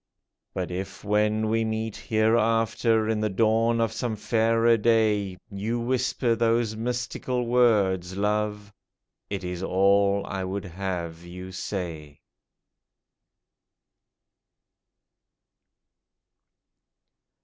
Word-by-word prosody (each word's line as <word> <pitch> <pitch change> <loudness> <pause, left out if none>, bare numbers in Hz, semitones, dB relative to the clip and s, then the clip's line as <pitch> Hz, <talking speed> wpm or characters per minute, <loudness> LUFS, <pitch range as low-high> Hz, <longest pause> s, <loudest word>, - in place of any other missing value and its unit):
But 90 -1 -3
if 95 +2 -6
when 105 +1 +1
we 115 +1 +1
meet 110 -1 -3
hereafter, 115 0 +2
In 110 -1 0
the 110 0 0
dawn 115 +3 +2
of 115 -1 0
some 115 0 -2
fairer 115 +2 +2
day, 105 -4 +2
You 110 +4 -2
whisper 125 0 0
those 115 -1 +1
mystical 125 +1 -2
words, 100 -7 +2
lovCj, 105 0 -1 0.6
It 100 -2 -4
is 90 0 -4
all 100 +1 +2
I 95 -1 -4
would 95 +2 -4
have 85 -2 -5
you 90 +2 -9
say 85 -6 -5
105 Hz, 95 wpm, -26 LUFS, 95-115 Hz, 0.6 s, hereafter